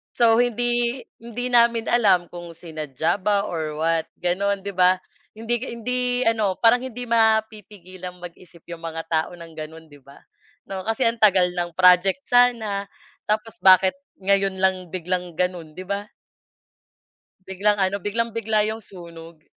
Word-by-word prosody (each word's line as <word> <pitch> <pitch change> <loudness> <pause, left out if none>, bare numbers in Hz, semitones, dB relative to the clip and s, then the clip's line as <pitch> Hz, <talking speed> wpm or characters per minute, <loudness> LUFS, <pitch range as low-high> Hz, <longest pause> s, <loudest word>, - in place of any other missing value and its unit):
So, 230 -1 +4
hindi 240 +1 +1 0.2
hindi 240 +2 -5
namin 235 -1 +3
alam 200 -7 +3
kung 175 -1 -9
sinadya 160 +1 -3
ba 200 +1 +1
or 155 -2 -4
what 160 +1 0 0.2
gano'n, 195 +2 0
'di 200 - -4
ba. 185 0 +4 0.4
Hindi 230 +2 -1 0.2
hindi 250 +2 -1 0.2
ano 215 -4 +1
parang 235 +2 +4
hindi 245 0 -6
mapipigilan 215 -5 -1
mag-isip 170 -1 -13
yung 170 - -7
mga 165 0 -6
tao 160 +2 0
ng 170 -1 -12
ganun 160 0 -10
'di 145 - -15
ba 140 +1 -17 0.6
'no. 190 +1 -5
Kasi 225 +3 0
ang 230 0 +1
tagal 185 -4 +4
ng 175 -1 -4
project 185 +8 +4
sana 225 -5 +2 0.4
tapos 215 +2 -2
bakit 190 +6 +5 0.2
ngayon 195 0 +2
lang 185 -1 0
biglang 180 -1 -4
ganun, 175 -4 -3
'di 185 - -7
ba? 200 +2 -4 1.4
Biglang 205 +2 0
ano, 195 0 0
biglang-bigla 220 0 0
yung 225 - -9
sunog. 165 -4 -13
195 Hz, 145 wpm, -23 LUFS, 175-225 Hz, 1.4 s, bakit